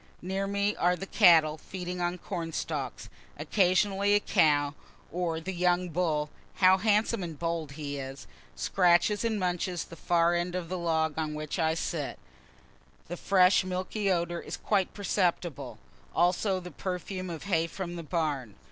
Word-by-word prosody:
Near 190 +2 -2
me 200 +1 0
are 180 +1 +3
the 195 - -6
cattle, 165 -7 +5
feeding 180 0 -6
on 175 +1 -1
corn 170 -3 -5
stalks. - - -4 0.3
Occasionally 200 +1 +2
a - - +5
cow 145 -8 +2 0.4
or 170 -1 -1
the 190 +4 -5
young 180 0 +1
bull 155 -3 0 0.2
(how 185 0 +5
handsome 215 +1 +2
and 165 -4 -5
bold 165 -3 -3
he 145 -1 -5
is!) 135 0 -7 0.3
scratches 180 +3 +3
and 225 -2 0
munches 180 -1 -1
the 165 - -12
far 170 +1 +2
end 175 +1 -1
of 175 -2 -4
the 185 - -2
log 160 -2 0
on 155 -1 -2
which 155 +3 -4
I 160 -1 +2
sit. - - -3 0.9
The 175 - -3
fresh 185 +1 +4
milky 185 +3 -2
odor 175 -1 0
is - - -6
quite 195 -3 0
perceptible, 180 -6 -1 0.4
also 185 +3 +2
the 180 -1 -9
perfume 185 +3 -4
of 165 -2 -6
hay 165 -4 +1
from 175 0 -6
the 170 - -5
barn. 150 - -2
175 Hz, 160 wpm, -29 LUFS, 165-190 Hz, 0.9 s, cattle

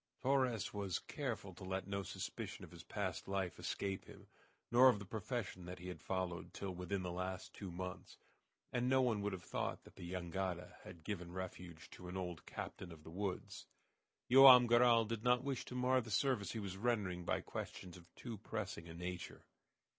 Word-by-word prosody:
Torres 130 -6 +2
was 100 -3 -1
careful 115 -9 -4
to 90 - -11
let 95 0 -2
no 100 0 -2
suspicion 95 - -5
of - - -16
his 85 -1 -10
past 95 -2 -3
life 95 -2 -1
escape 95 -1 -2
him, - - -13 0.5
nor 125 +2 +9
of 125 - +3
the 100 - -7
profession 105 -2 -3
that 90 +1 -6
he 90 +1 -7
had 90 - -7
followed 90 -2 -3
till 100 -1 -3
within 90 +2 -2
the 90 - -2
last 90 +1 -4
two 100 - -6
months, 90 +1 -6 0.6
and 125 0 +2
no 130 0 +5
one 120 -5 +2
would 105 0 0
have 95 -2 -5
thought - - -2
that - - -17
the 85 0 -6
jangada 90 0 -2
had 85 -3 -11
given 90 -2 -4
refuge 90 -3 -6
to 90 - -9
an 90 +1 -4
old 90 -4 -4
captain 90 - -6
of 80 -2 -11
the 80 - -10
woods. 95 +1 -4 0.6
Joam 130 -1 +11
Garral 120 -1 +6
did 110 0 -3
not 125 0 +4
wish 135 -3 -2
to 125 - -7
mar 125 +1 +3
the 115 - -9
service 110 -3 +1
he 115 - -2
was 95 -2 -4
rendering 100 -6 0
by - - 0
questions 90 -2 -6
of 85 -1 -14
too 115 -5 -6
pressing 105 -5 -4
a 80 - -8
nature. 90 0 -5
95 Hz, 195 wpm, -39 LUFS, 90-115 Hz, 0.6 s, Joam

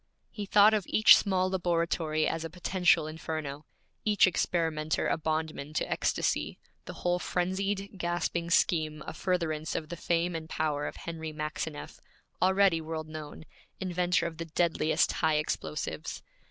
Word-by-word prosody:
He 210 -3 -6
thought 210 +2 +6
of 210 -4 0
each 215 - +8
small 185 -2 +1
laboratory 170 -3 0
as 165 0 -2
a 165 - -4
potential 175 -2 +2
inferno, 155 -2 -5 0.4
each 210 -1 +5
experimenter 160 -4 0
a - - +2
bondman 155 -2 -3
to - - -1
ecstasy, - - -1 0.3
the - - -7
whole 175 0 +2
frenzied, 195 +2 -2
gasping 170 0 -1
scheme 155 -3 +2
a - - -6
furtherance 165 -4 -1
of 155 - -3
the 175 - -4
fame 170 +1 0
and 160 -1 -5
power 150 -2 -1
of - - -6
Henry 160 -1 -6
Maxineff, 155 0 -5 0.4
already 190 -2 +4
world 155 0 -5
known, 155 0 -8 0.3
inventor 180 -2 +1
of 165 -1 -5
the 165 - -3
deadliest 160 -1 +1
high 160 -1 +3
explosives. 80 - -3
165 Hz, 145 wpm, -29 LUFS, 155-180 Hz, 0.4 s, each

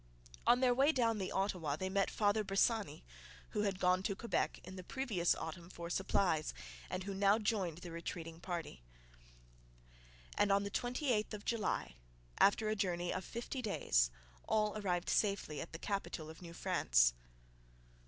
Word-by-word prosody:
On 245 - +6
their 250 -1 +5
way 275 +5 +5
down 230 -6 +1
the 190 - -3
Ottawa 180 -7 0
they 185 +5 -3
met 195 +1 +1
Father 210 0 +2
Bressani, 200 - +1 0.5
who 210 - -1
had 200 -2 0
gone 180 0 +3
to 200 0 -1
Quebec 235 +3 -1
in 185 - -9
the 185 - -7
previous 210 -7 0
autumn 170 +1 -6
for 170 -1 -7
supplies, 175 -4 +1 0.3
and 185 +1 -3
who 200 +1 -4
now 200 +2 +4
joined 205 -7 -1
the 175 -1 -8
retreating 165 0 -6
party. 170 - -5 1.5
And 205 - +3
on 200 0 +4
the 200 - -4
28th 245 -3 0
of 205 - -10
July, 215 - -1 0.4
after 210 +2 +5
a 215 - +1
journey 175 -3 -1
of 185 - -3
fifty 240 +6 -5
days, - - +2 0.4
all 210 -1 +2
arrived 180 -4 -1
safely 200 -7 +1
at - - -7
the 165 - -6
capital 170 -5 -3
of 160 - -14
New 170 -1 -9
France. - - +3
195 Hz, 165 wpm, -36 LUFS, 175-215 Hz, 1.5 s, On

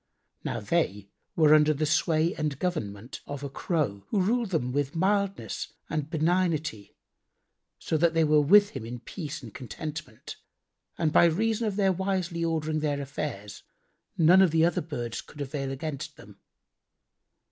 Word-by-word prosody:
Now - - -2
they 100 +1 -1 0.2
were 155 -2 +6
under 155 0 +5
the 155 +2 0
sway 160 +2 +2
and 150 -3 -2
government 120 - -4
of 145 -1 -6
a 140 - -5
Crow 135 - -2
who 205 - +1
ruled 225 +4 +1
them 150 -9 -1
with 140 +2 -1
mildness 200 +2 -1 0.2
and 155 -2 -2
benignity, 160 - 0 0.8
so 160 - -1
that 165 +1 +2
they 165 - +4
were 150 -1 +4
with 200 +7 +6
him - - -6
in 120 +1 -7
peace 155 -4 -6
and 110 -4 -10
contentment; 150 -1 -7 0.6
and 155 -2 0
by - - +7
reason 220 +7 +1
of 205 - -2
their 195 -2 +3
wisely 185 -2 -2
ordering 155 -1 0
their 145 -2 -1
affairs, 140 -8 -5 0.6
none 175 +3 +6
of 190 - +5
the 160 +1 +3
other 170 - +1
birds 120 -7 -5
could 150 - -15
avail 140 -1 -3
against 150 +2 -5
them. 100 0 -15
155 Hz, 160 wpm, -27 LUFS, 140-175 Hz, 0.8 s, by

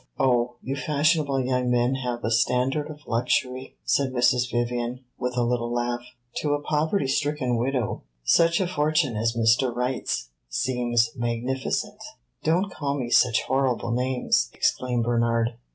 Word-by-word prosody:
"Oh, 125 -2 +2
you 135 - -3
fashionable 145 0 +1
young 125 -1 0
men 120 +1 +2
have 125 -3 -3
a 110 - -1
standard 125 +6 +1
of 150 -1 -10
luxury!" 125 +2 -1
said 140 -2 +1
Mrs. 125 0 +2
Vivian, 120 +1 -2 0.2
with 125 0 -2
a 120 - +3
little 120 0 -1
laugh. 120 0 -1 0.4
"To 145 -1 +1
a - - -2
poverty 150 +3 0
stricken 135 -2 0
widow 125 -1 -1 0.2
such 165 - +4
a 190 - +1
fortune 155 -6 +1
as 115 +2 0
Mr. 115 +3 +3
Wright's 125 - -2 0.2
seems 120 - +1
magnificent." 120 +2 -2 0.4
"Don't 180 +5 +1
call 140 -4 -2
me 120 -3 -4
such 125 -3 +4
horrible 130 -3 0
names!" 125 - +1
exclaimed 125 -2 0
Bernard. 115 0 +1
125 Hz, 145 wpm, -25 LUFS, 120-140 Hz, 0.4 s, such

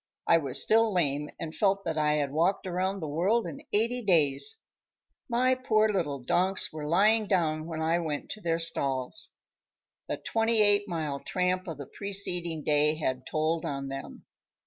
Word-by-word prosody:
I 165 - +5
was 140 -5 0
still 225 0 +4
lame 150 -5 0
and 160 -1 -5
felt 195 -1 +1
that 165 -2 -2
I 150 -1 +2
had 145 -2 0
walked 170 +7 +1
around 185 +2 -2
the 155 - -4
world 190 +10 +1
in 165 -5 -7
eighty 235 +4 +1
days. 175 - +2 0.7
My 250 +2 +3
poor 220 -4 +2
little 170 -9 -1
donks 185 +7 +1
were 150 -1 -5
lying 210 +6 +3
down 160 -5 0
when 160 -1 -4
I 165 +2 +2
went 155 -4 -4
to 215 - -6
their 165 -2 0
stalls. 140 - -2 0.7
The - - -3
twenty 225 -1 +1
eight 205 0 +3
mile 155 -6 -3
tramp 185 +2 -1
of 165 -4 -5
the 140 - -7
preceding 180 -4 -1
day 150 +1 +3
had 130 -5 -3
told 155 +1 -1
on 140 -1 -4
them. 135 0 -8
170 Hz, 170 wpm, -28 LUFS, 150-200 Hz, 0.7 s, I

